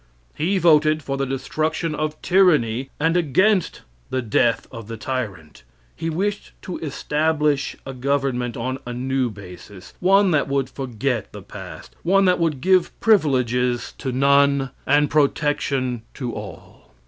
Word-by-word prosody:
He 185 +6 0
voted 155 -3 +4
for 135 - -3
the 135 0 -2
destruction 155 +5 -2
of 155 0 -3
tyranny, 135 -10 +3
and 165 +3 +2
against 180 +4 +2 0.3
the 130 -1 -2
death 115 +1 +1
of 115 -4 -9
the 115 0 -6
tyrant. 105 - -5 0.3
He 165 - -3
wished 195 +5 -2
to 180 - -5
establish 150 -1 0
a 135 - -6
government 130 -2 -1
on 130 +3 -3
a 120 - -4
new 130 0 -1
basis 95 -1 -12
one 195 +1 +4
that 150 -3 +2
would 140 -1 -1
forget 125 -3 -3
the - - -10
past; - - -10
one 195 +3 +3
that 180 -1 +3
would 155 -6 0
give 185 +2 +2
privileges 125 - +2
to 130 - -3
none, 140 0 +3 0.2
and 145 +1 +4
protection 140 -4 0
to 125 -4 -4
all. 95 -10 -11
140 Hz, 145 wpm, -22 LUFS, 125-155 Hz, 0.3 s, voted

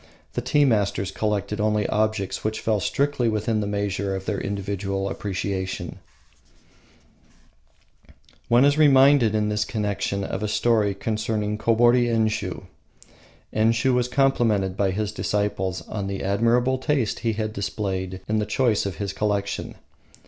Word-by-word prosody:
The - - -2
tea 145 -1 +3
masters 100 -5 +1
collected 105 +1 -2
only 105 -1 +1
objects 110 -2 -1
which 110 0 -2
fell 110 -2 0
strictly 140 +2 0
within 110 0 0
the 105 - -2
measure 100 -1 -2
of 95 0 -6
their 105 -2 -2
individual 100 -1 -3
appreciation. 95 -1 -4 2.5
One 120 +3 +5
is 145 +2 +3
reminded 135 -5 +5
in 105 0 +1
this 105 0 0
connection 105 -2 -2
of 95 - -4
a 105 - -1
story 105 -2 +1
concerning 105 -1 -2
Kobori 120 +2 +4
Enshiu. 110 -1 -1 0.9
Enshiu 115 +4 +2
was 125 -1 +1
complimented 120 -8 +1
by 100 -1 +1
his 105 +2 -2
disciples 95 -3 -2
on 100 -3 -4
the 100 0 -4
admirable 115 +6 +2
taste 130 -5 0
he 115 -2 0
had 110 0 -3
displayed 95 -2 -3
in 110 +1 +1
the 105 - -2
choice 110 -2 +1
of 95 - -5
his 100 +3 -4
collection. 100 -2 -2
105 Hz, 140 wpm, -24 LUFS, 100-115 Hz, 2.5 s, One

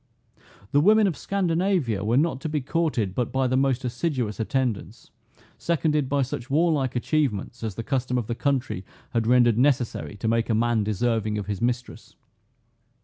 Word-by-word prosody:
The 145 - +4
women 215 +5 +5
of 185 -5 0
Scandinavia 175 - 0
were 115 +4 +2
not 145 -2 +1
to 160 - -3
be 150 0 0
courted 140 - -1
but 120 +2 -2
by 135 0 +1
the 130 0 +1
most 135 -1 +1
assiduous 125 -3 -2
attendance, 120 -1 -2 0.5
seconded 150 -4 0
by 140 0 +2
such 125 -1 -5
warlike 145 -4 +1
achievements 125 -5 -1
as 110 -4 -3
the 115 - -4
custom 125 0 -1
of 120 - -1
the 120 - -3
country 130 -7 -1 0.3
had 115 -2 0
rendered 120 -2 +4
necessary 125 -6 +1
to 110 - -3
make 115 +1 +1
a 110 - +2
man 115 -1 +2
deserving 110 +1 0
of 105 - -3
his 100 -2 -4
mistress. 120 0 -3
125 Hz, 170 wpm, -25 LUFS, 115-145 Hz, 0.5 s, women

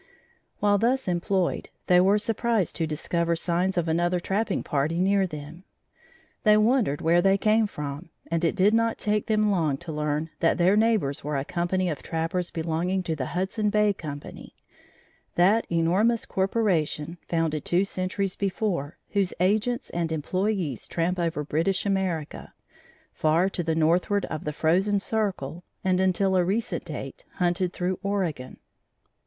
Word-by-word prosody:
While 205 -1 +3
thus 255 +3 +1
employed, 180 +1 0 0.2
they 180 0 +5
were 195 +3 +4
surprised 225 -2 0
to 165 - 0
discover 170 +2 -1
signs 180 +3 0
of 175 -1 +1
another 175 +2 +1
trapping 200 +5 -1
party 150 +4 -1
near 195 +1 +3
them. 155 +2 -9 0.8
They 210 -2 +5
wondered 215 - +2
where 170 +2 +4
they 195 +1 +4
came 215 +2 +3
from 150 -1 -6 0.2
and 165 0 0
it 165 - +2
did 205 +2 +4
not 230 0 +2
take 210 0 0
them 215 -1 +2
long 160 -7 +1
to 170 +2 -8
learn 150 +1 -2
that 165 - +2
their 180 +3 +4
neighbors 215 -11 +1
were 150 0 -2
a 135 - -2
company 180 +2 -1
of 155 -5 -3
trappers 165 +2 -2
belonging 170 +3 -1
to 165 -2 -2
the 130 -4 -3
Hudson 190 +4 -1
Bay 210 0 +3
Company 145 -5 -9 0.8
that 200 +6 +3
enormous 185 +8 +2
corporation, 175 -5 0
founded 165 -3 -1
two 180 +3 +2
centuries 190 0 -2
before, 190 -7 -2
whose 200 -3 0
agents 215 +6 +1
and 170 -1 -2
employees 180 - -1
tramp 175 +2 -1
over 165 -3 -1
British 165 +7 0
America, 190 -6 -2 0.6
far 165 +5 +2
to 185 - -3
the 165 -1 -1
northward 175 +5 +2
of 155 - -4
the 150 - -1
frozen 190 +7 +2
circle, 185 -7 -2 0.2
and 185 0 +2
until 190 +1 +2
a 180 - +4
recent 215 +7 -2
date - - -7
hunted 175 0 0
through 180 0 -2
Oregon. 185 -10 -2
180 Hz, 155 wpm, -26 LUFS, 165-200 Hz, 0.8 s, they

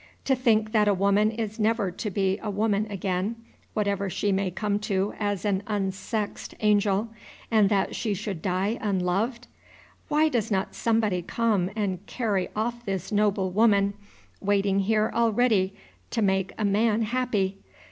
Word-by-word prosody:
To 265 - +3
think 220 -4 +2
that 215 -2 +3
a 205 - +4
woman 200 +2 +3
is 220 -1 -4
never 215 -3 +1
to 210 +4 -4
be 195 +1 0
a 215 - -4
woman 210 +1 0
again, 195 +2 -2 0.4
whatever 200 -2 0
she 200 +2 0
may 195 0 +1
come 205 +3 -1
to 200 -1 -1
as 205 -2 -1
an 195 -2 +1
unsexed 205 +1 -3
angel, 210 0 +2 0.4
and 215 -3 +5
that 200 -2 +1
she 215 -4 -1
should 195 -4 -5
die 190 +5 -1
unloved! 205 +5 0 0.6
Why 305 0 +3
does 235 -7 0
not 195 -2 -1
somebody 220 -6 +1
come 205 -1 0
and 195 -4 -2
carry 205 -7 -1
off 235 +2 -2
this 195 -3 -3
noble 200 -3 +1
woman, 200 -1 +3 0.5
waiting 200 -1 +1
here 215 +2 +2
all 235 -1 +3
ready 205 -4 +2 0.3
to 225 - 0
make 190 -1 +1
a 215 - 0
man 215 +2 +2
happy? 210 -5 -1
205 Hz, 155 wpm, -26 LUFS, 195-220 Hz, 0.6 s, and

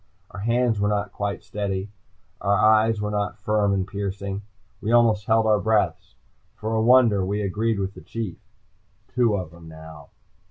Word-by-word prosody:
Our 100 - -8
hands 115 +1 +1
were 105 0 +1
not 100 -1 -1
quite 100 -2 -3
steady. 100 -1 -4 0.5
Our 100 +1 +2
eyes 110 +1 +4
were 105 0 -2
not 105 0 -2
firm 105 -1 +1
and 95 -1 0
piercing. 100 0 -4 0.4
We 110 - -2
almost 115 -4 +4
held 110 0 +3
our 105 -1 +3
breaths. 110 -1 0 0.4
For 110 +1 -4
a 110 - +2
wonder, 115 -4 +5
we 100 +2 -1
agreed 110 +3 0
with 100 0 -3
the - - -12
Chief. 110 -7 -6 0.7
Two 120 -4 +2
of 90 -4 -6
'em 85 -1 -13
now. 80 -2 -12
105 Hz, 170 wpm, -24 LUFS, 100-110 Hz, 0.7 s, wonder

